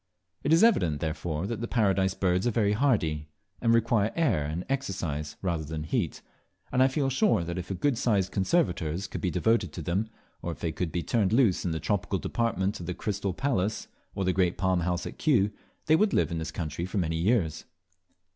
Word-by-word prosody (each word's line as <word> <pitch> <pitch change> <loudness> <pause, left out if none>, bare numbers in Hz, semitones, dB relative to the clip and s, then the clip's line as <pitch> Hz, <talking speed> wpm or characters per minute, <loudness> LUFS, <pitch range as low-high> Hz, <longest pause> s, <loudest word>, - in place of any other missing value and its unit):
It 145 - -1
is 165 +4 +6
evident, 90 - +3
therefore, 80 +1 -2
that 115 +1 -4
the 120 - -2
Paradise 95 -5 +2
Birds 90 +2 +1
are - - +4
very 105 -3 +2
hardy, 95 - +1 0.3
and 115 - +3
require 115 -2 +3
air 115 - +2
and 80 +4 -4
exercise 85 - -3
rather 85 -4 -1
than 80 0 -5
heat; 80 - -2 0.5
and 125 - +2
I 130 - +7
feel 135 +1 0
sure 130 - +3
that 85 +2 -4
if 90 - -7
a 95 - -2
good 120 +5 0
sized 100 -5 +1
conservators` 95 - 0
could - - -6
be 90 - 0
devoted 95 0 +1
to 85 - -6
them, 95 +7 -1 0.3
or 85 - -3
if - - -13
they 85 - -2
could 85 0 -3
be 85 - -2
turned 105 -6 +1
loose 115 -8 +3
in - - +1
the 80 -1 -2
tropical 100 0 -1
department 105 -3 -1
of 85 - -7
the 90 - -3
Crystal 100 -2 -2
Palace 110 -6 -1 0.3
or 95 - -1
the 95 - +2
Great 90 0 +1
Palm 95 -2 +1
House 90 +1 -1
at - - -8
Kew, 115 -10 +3 0.3
they 155 - +5
would 205 +4 +2
live - - +2
in 85 - -2
this 80 - -4
country 85 +1 -4
for 100 - -4
many 80 -3 0
years. 85 -4 +1
95 Hz, 210 wpm, -28 LUFS, 85-115 Hz, 0.5 s, I